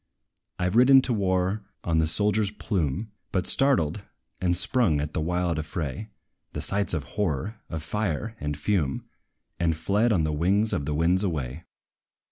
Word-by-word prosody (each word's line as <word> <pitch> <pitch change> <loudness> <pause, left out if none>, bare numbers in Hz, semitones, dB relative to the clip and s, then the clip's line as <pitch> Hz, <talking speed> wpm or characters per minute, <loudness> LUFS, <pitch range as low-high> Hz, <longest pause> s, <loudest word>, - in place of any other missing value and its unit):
I 90 - 0
've 90 - -2
ridden 130 +2 +7
to 130 - 0
war 95 0 0 0.2
on 80 -1 +1
the 80 - +2
soldier's 105 +5 +2
plume; 100 - -2 0.2
But 95 -1 0
startled, 100 - +2 0.4
and 90 -1 +2
sprung 90 - +2
at 75 +1 -3
the - - -1
wild 90 0 0
affray, 75 +3 -4 0.5
The - - -3
sights 100 -2 0
of 75 - -2
horror, 100 - -3
of 80 -2 -4
fire 105 +4 -2
and 75 -1 -3
fume, 75 -4 0 0.5
And 85 -1 +2
fled 105 +8 +2
on 90 -7 +2
the 80 0 0
wing 100 +8 +2
of 70 - -1
the 75 0 -1
winds 85 +5 +2
away. 75 -3 -3
90 Hz, 165 wpm, -26 LUFS, 80-105 Hz, 0.5 s, ridden